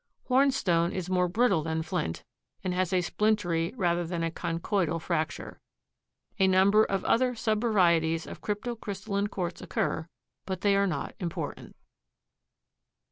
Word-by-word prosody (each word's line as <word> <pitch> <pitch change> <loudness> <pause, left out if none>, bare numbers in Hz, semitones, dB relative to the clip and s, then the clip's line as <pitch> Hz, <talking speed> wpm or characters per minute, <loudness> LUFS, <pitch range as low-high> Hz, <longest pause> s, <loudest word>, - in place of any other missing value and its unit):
Hornstone 250 -11 +3
is 185 -1 -4
more 180 -1 +3
brittle 220 -2 +2
than 160 +1 -2
flint 85 - -3 0.4
and 185 -1 -1
has 185 -1 0
a 185 -1 +3
splintery 180 -4 0
rather 175 -3 +1
than 170 0 -3
a 165 - -1
conchoidal 165 0 -1
fracture. 160 -1 -3 0.8
A 190 - +5
number 195 +3 +5
of 195 -2 -1
other 250 +1 +2
subvarieties 185 -8 +2
of - - -9
crypto 215 +3 -3
crystalline 200 -1 -3
quartz 180 -4 -4
occur, 160 0 -2 0.4
but 190 -2 -3
they 200 -1 +3
are 200 0 +3
not 145 -7 -3
important. 175 -4 -5
185 Hz, 135 wpm, -28 LUFS, 170-205 Hz, 0.8 s, A